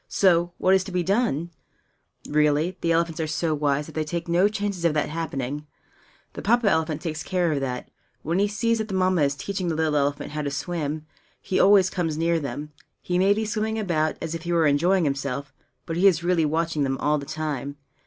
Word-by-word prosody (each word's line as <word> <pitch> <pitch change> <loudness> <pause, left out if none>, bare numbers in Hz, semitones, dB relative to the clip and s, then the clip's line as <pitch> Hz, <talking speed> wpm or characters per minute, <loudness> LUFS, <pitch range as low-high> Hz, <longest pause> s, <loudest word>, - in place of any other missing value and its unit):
So, 175 -3 +3
what 185 - +3
is 190 -1 +4
to 195 - -7
be 180 -1 0
done? 175 - 0 0.8
Really, 150 +3 +2
the 170 - +1
elephants 165 -1 +1
are 160 - -1
so 160 +1 -1
wise 145 -1 0
that 160 - -11
they 155 - -1
take 170 +3 -4
no 175 +4 +4
chances 205 -4 -3
of 165 -2 +2
that 150 - 0
happening. 150 -2 -4 0.7
The - - -6
Papa 235 +1 +2
elephant 160 -4 +1
takes 155 -2 -3
care 180 -3 0
of 145 - 0
that. 125 -2 -4 0.3
When 165 +4 0
he 205 - +3
sees 230 +2 0
that 220 - -2
the 195 - -4
Mamma 185 -2 +2
is 140 -1 +2
teaching 190 +3 -3
the 165 - 0
little 155 -1 +1
elephant 145 0 0
how 150 0 -3
to 145 - -2
swim, 155 +1 -3 0.3
he 185 - -1
always 195 -1 +5
comes 165 -4 -2
near 165 +1 +1
them. 150 +1 -5 0.3
He 180 0 -1
may 195 +2 +4
be 220 +1 -1
swimming 220 0 -1
about, 165 -7 0
as 165 -1 -3
if 165 - -4
he 175 - -4
were 165 -2 +3
enjoying 170 +6 +3
himself; 140 -1 -2 0.3
but 165 - -3
he 190 +3 +5
is 170 -3 +3
really 175 -2 +2
watching 160 0 0
them 135 -1 -1
all 150 +2 +1
the 140 - -8
time. 145 -3 -4
165 Hz, 220 wpm, -25 LUFS, 150-185 Hz, 0.8 s, always